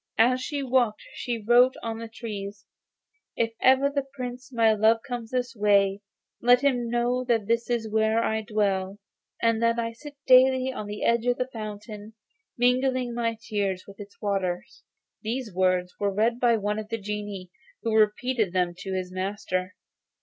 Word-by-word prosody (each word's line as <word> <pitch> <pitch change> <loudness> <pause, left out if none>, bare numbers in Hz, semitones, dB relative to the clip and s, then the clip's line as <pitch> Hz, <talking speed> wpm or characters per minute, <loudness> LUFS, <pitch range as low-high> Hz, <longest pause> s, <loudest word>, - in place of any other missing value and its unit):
As 255 +3 +4
she 285 +1 -3
walked 245 -4 +1
she 240 -2 -3
wrote 245 +2 +6
on 225 -1 -4
the 230 - -6
trees: 205 -3 -7 0.7
'If 230 -1 0
ever 265 +2 +5
the 280 0 -1
Prince, 250 0 -6
my 225 -3 +4
lover, 220 +2 +4
comes 240 -3 -5
this 250 -1 -2
way, 200 -1 +3 0.4
let 245 +1 +5
him 250 -4 +1
know 240 +1 0
that 235 -3 +2
it 230 +1 +1
is 235 -2 0
here 220 0 +2
I 220 -1 +1
dwell, 200 -2 -1 0.5
and 230 -1 +2
that 230 0 +2
I 230 -1 -1
sit 285 +5 -11
daily 260 0 +5
on 210 - -6
the 210 0 -5
edge 235 +1 +2
of 245 - +2
this 255 +1 -3
fountain, 210 0 -8 0.4
mingling 250 0 +1
my 230 -1 -1
tears 200 -5 -2
with 200 0 -14
its 205 0 -11
waters.' 190 -4 -2 0.4
These 230 -1 -4
words 185 -1 +1
were 200 -1 +1
read 225 +4 +1
by 235 -2 +4
one 210 0 -2
of 215 0 -7
the 225 - -2
genii, 205 -3 -6 0.3
who 225 -1 -1
repeated 220 -1 +2
them 180 -2 +1
to 190 0 -5
his 185 -1 -3
master. 185 0 -3
225 Hz, 170 wpm, -26 LUFS, 205-245 Hz, 0.7 s, wrote